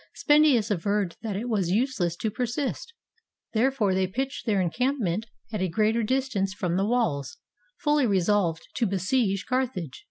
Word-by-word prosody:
Spendius 295 -8 +4
averred 200 -1 0
that 220 -4 -3
it 220 +5 -3
was 200 -7 0
useless 205 -5 0
to 215 +4 -2
persist; 250 - -3 0.6
there 235 +4 +3
fore 215 -8 +1
they 190 0 +1
pitched 265 +7 -4
their 205 -3 +2
encampment 220 - 0 0.3
at 210 - -2
a 185 - +1
greater 220 +5 +2
dis 260 +4 0
tance 195 -5 -2
from 180 -4 -1
the 195 +2 +1
walls, 215 - 0 0.4
fully 295 -3 +2
resolved 190 -4 +1
to 235 - +2
besiege 195 +1 0
Carthage. 240 - -2
210 Hz, 160 wpm, -26 LUFS, 190-250 Hz, 0.6 s, Spendius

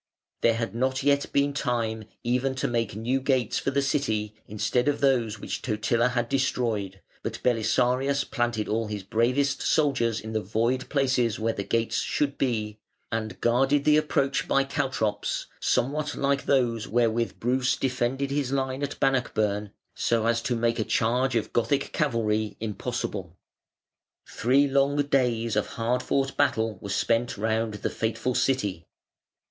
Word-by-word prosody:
There 115 -1 +4
had 115 -1 -3
not 130 +2 0
yet 140 0 +2
been 140 0 +2
time 115 -5 -1 0.2
even 125 +2 0
to 130 - -1
make 115 -4 -1
new 125 +5 0
gates 130 -4 +1
for - - -1
the 140 0 +1
City 110 -7 0
instead 110 +5 0
of 145 -1 +1
those 120 -6 +2
which - - -4
Totila 115 +1 +1
had 120 -2 -1
destroyed, 115 -7 -1 0.2
but - - -4
Belisarius 125 +4 +2
planted 120 -4 -1
all 110 +1 -1
his 105 -2 -5
bravest 125 +7 +1
soldiers 125 -7 +2
in 110 0 -7
the 110 - 0
void 115 +6 -1
places 130 -5 +1
where 115 +1 0
the 100 - -3
gates 115 +2 0
should 145 -1 -1
be, 110 -5 -1 0.3
and 110 -1 -3
guarded 135 +4 +3
the 150 0 +5
approach 140 -2 +1
by 135 - +3
caltrops 130 -7 -1
(somewhat 145 +3 0
like 140 0 0
those 120 -5 +1
wherewith 115 +1 0
Bruce 125 +2 +1
defended 130 +1 -1
his 140 -2 -1
line 135 0 -1
at 145 - -4
Bannockburn), 110 -6 +1 0.2
so 115 -1 0
as 115 0 +2
to 120 +1 -1
make 115 0 0
a - - +2
charge 125 +4 +1
of 115 - -1
Gothic 140 +4 +1
cavalry 110 -7 0
impossible. 105 -5 -4 0.9
Three 135 +5 +2
long 140 +1 +2
days 120 -5 +1
of 105 - +1
hard 120 +2 -1
fought 135 +1 0
battle 110 -2 +1
were 100 - -7
spent 115 +4 0
round 110 +1 0
the - - -3
fateful 115 +2 -1
City. 105 -12 0
120 Hz, 155 wpm, -26 LUFS, 110-135 Hz, 0.9 s, the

